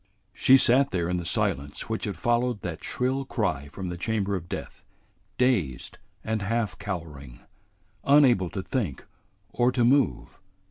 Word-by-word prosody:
She 130 - +6
sat 135 +2 +4
there 85 -3 -1
in 90 - 0
the 85 - -4
silence 70 -3 -1
which 110 0 -3
had 100 -5 -4
followed 120 +1 0
that 85 -3 -5
shrill 130 +2 -1
cry 90 - -2
from 90 +6 -6
the 90 - -5
chamber 100 +1 -1
of 85 -2 -6
death, - - -7 0.5
dazed 105 - 0 0.2
and 110 -1 -2
half 110 -1 -1
cowering, 75 -11 -7 0.6
unable 130 - +4
to 95 - -5
think 100 - -3 0.5
or 120 +1 +2
to 125 -2 +2
move. 135 +2 +1
105 Hz, 150 wpm, -26 LUFS, 85-125 Hz, 0.6 s, She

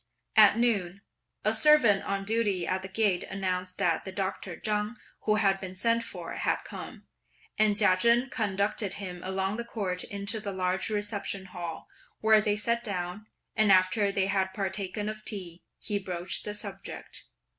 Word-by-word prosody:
At 215 -1 +7
noon, 200 -6 +1 0.4
a 215 - +3
servant 235 -7 +6
on 195 0 -2
duty 205 -5 +1
at 185 0 -1
the 190 - -6
gate 195 -2 +1
announced 185 -1 -3
that 175 -5 +1
the 190 - -6
Doctor 190 -2 -4
Chang, 210 +1 -1 0.3
who 215 - +3
had 195 -2 +2
been 185 -1 -7
sent 230 +4 +2
for, 180 -5 -6
had - - 0
come, - - -9 0.5
and 215 -1 +4
Chia 200 -4 +6
Chen 235 +6 +3
conducted 205 -2 -1
him 180 -3 -6
along 190 +2 -1
the 235 - -3
Court 195 -6 -3
into 200 +1 -2
the 205 -1 -4
large 185 +1 -1
reception 205 -2 -2
Hall, 175 -2 -7 0.3
where 220 -1 +5
they 210 -1 +1
sat 235 +3 +1
down; 190 0 -4 0.3
and 215 -2 +4
after 190 +2 +4
they 195 -1 +1
had 190 -1 0
partaken 195 +1 -3
of 215 0 -5
tea, 185 -6 -6 0.2
he 205 -2 -2
broached 180 -2 -3
the 210 - -3
subject. 210 - -5
200 Hz, 165 wpm, -29 LUFS, 185-215 Hz, 0.5 s, At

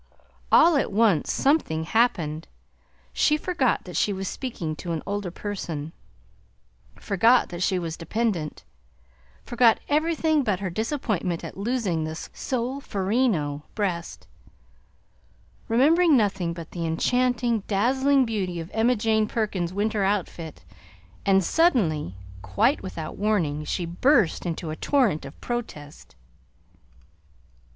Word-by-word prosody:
All 330 -1 +6
at 275 - 0
once 205 -7 +2
something 270 - +1
happened. 165 -6 0 0.7
She 300 - +3
forgot 305 -7 0
that 180 - -9
she 210 - +2
was 195 -1 -4
speaking 175 - -4
to 170 -2 -4
an 160 - -4
older 200 -2 -3
person; 170 -5 -5 1.0
forgot 230 +6 +3
that 175 0 -6
she 185 0 +1
was 165 -2 -4
dependent; 175 -3 -2 0.8
forgot 240 -2 +3
everything 315 0 +2
but 205 -6 0
her 190 -3 -3
disappointment 215 - -2
at - - -7
losing 200 -6 -1
the 155 0 -4
solferino 220 - -2
breast, 180 -5 -3 1.4
remembering 300 +6 +4
nothing 195 -6 0
but 170 -1 -8
the 170 - -4
enchanting, 245 +6 +1
dazzling 265 +6 +2
beauty 190 -6 -2
of 165 +2 -7
Emma 230 +3 +3
Jane 220 -1 +1
Perkins's 205 -7 -2
winter 205 +1 0
outfit; 180 -5 -3 0.6
and 195 -1 +4
suddenly, 175 - +1 0.3
quite 100 - +1
without 165 -5 -6
warning, 175 -9 0
she 175 +3 -2
burst 185 - +2
into 165 -1 -4
a - - -4
torrent 225 - +1
of 135 - -11
protest. 155 - -6
205 Hz, 120 wpm, -25 LUFS, 170-245 Hz, 1.4 s, All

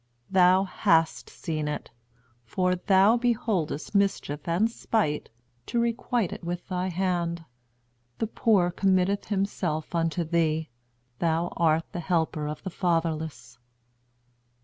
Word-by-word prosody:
Thou 185 0 +5
hast 165 -3 +1
seen 155 -2 -4
it; 150 - -4 0.5
for 180 +10 0
thou 195 +5 +4
beholdest 215 - -1
mischief 195 -7 0
and 175 +6 +2
spite, 205 -11 -1 0.4
to 240 - 0
requite 235 -3 0
it - - -9
with 175 +1 -4
thy 185 -1 -2
hand. 170 -2 -1 0.7
The - - 0
poor 205 -5 +2
committeth 190 +1 +1
himself 190 -6 -2
unto 165 0 0
thee; 160 -1 0 0.5
thou 165 +1 +1
art 165 -1 +1
the 175 - -4
helper 160 -3 0
of 150 0 -6
the 190 - -4
fatherless. 165 -6 -2
175 Hz, 120 wpm, -27 LUFS, 160-195 Hz, 0.7 s, Thou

